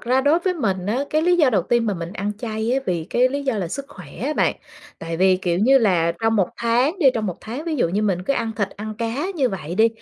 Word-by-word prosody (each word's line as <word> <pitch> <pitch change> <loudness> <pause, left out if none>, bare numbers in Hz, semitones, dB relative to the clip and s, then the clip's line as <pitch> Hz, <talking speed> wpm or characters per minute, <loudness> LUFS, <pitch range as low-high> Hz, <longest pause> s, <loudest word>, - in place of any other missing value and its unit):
ra 255 +2 +2
đối 290 +5 +3
với 365 +1 -1
mình 195 - -1
á, 245 +7 0
cái 310 +1 +2
lý 355 +1 +3
do 300 -6 +4
đầu 200 -6 +2
tiên 235 +5 +1
mà 205 - 0
mình 170 0 -6
ăn 205 0 -3
chay 220 0 -2
á 265 - +2
vì 170 -3 -1
cái 250 +1 +3
lý 280 +2 -3
do 265 -3 0
là 180 -4 -2
sức 275 +10 -5
khỏe 180 -5 -12
á 270 - -1
bạn. - - +1 0.4
Tại 165 0 -5
vì, 185 +1 +4
kiểu 175 -2 -1
như 265 +7 +5
là, 175 -8 +2
trong 225 0 +2
1 195 -4 +2
tháng 245 +9 +1
đi 320 - +3
trong 220 -2 -1
1 180 -2 -3
tháng, 245 +8 -6
ví 325 -2 -2
dụ 205 - +2
như 200 +5 -1
mình 190 -4 0
cứ 195 - 0
ăn 230 -4 -1
thịt 205 -3 0
ăn 215 +1 -7
cá 235 +8 -2
như 275 -6 +1
vậy 175 -5 -5
đi, 220 +4 +5
225 Hz, 290 wpm, -22 LUFS, 190-265 Hz, 0.4 s, như